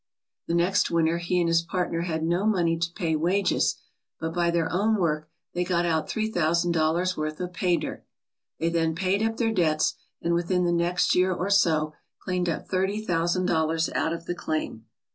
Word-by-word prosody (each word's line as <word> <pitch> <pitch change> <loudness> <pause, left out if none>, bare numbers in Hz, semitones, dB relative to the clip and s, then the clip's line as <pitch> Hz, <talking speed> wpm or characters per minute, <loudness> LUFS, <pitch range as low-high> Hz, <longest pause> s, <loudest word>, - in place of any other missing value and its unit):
The 170 - 0
next 175 +3 +2
winter 165 0 +1
he 175 +1 0
and 170 - +2
his 165 0 +3
partner 170 0 -2
had 160 -2 -2
no 175 +5 +1
money 175 -6 +2
to 165 0 -2
pay 165 -5 -1
wages, 180 +6 +1 0.4
but 160 0 -3
by 175 -1 +1
their 170 -1 +1
own 210 +4 +2
work 155 -3 -1 0.2
they 180 - 0
got 175 -1 0
out 160 -2 0
three 220 0 -1
thousand 170 -1 +1
dollars' 170 +3 +1
worth 155 0 -3
of 180 0 -4
pay 180 -2 +1
dirt. - - -5 0.5
They 165 - 0
then 165 -1 0
paid 190 +3 0
up 225 0 0
their 225 -2 +1
debts 155 -6 +2 0.3
and 170 - 0
within 175 +1 +1
the 175 - +2
next 170 +1 +2
year 185 +1 +3
or 185 +2 -2
so 155 -6 +3 0.2
cleaned 180 -2 -2
up 165 - -3
thirty 190 +3 0
thousand 175 +1 +1
dollars 160 -1 +1
out 160 - 0
of 165 0 -5
the 175 - -2
claim. 155 -9 -4
170 Hz, 200 wpm, -26 LUFS, 165-180 Hz, 0.5 s, his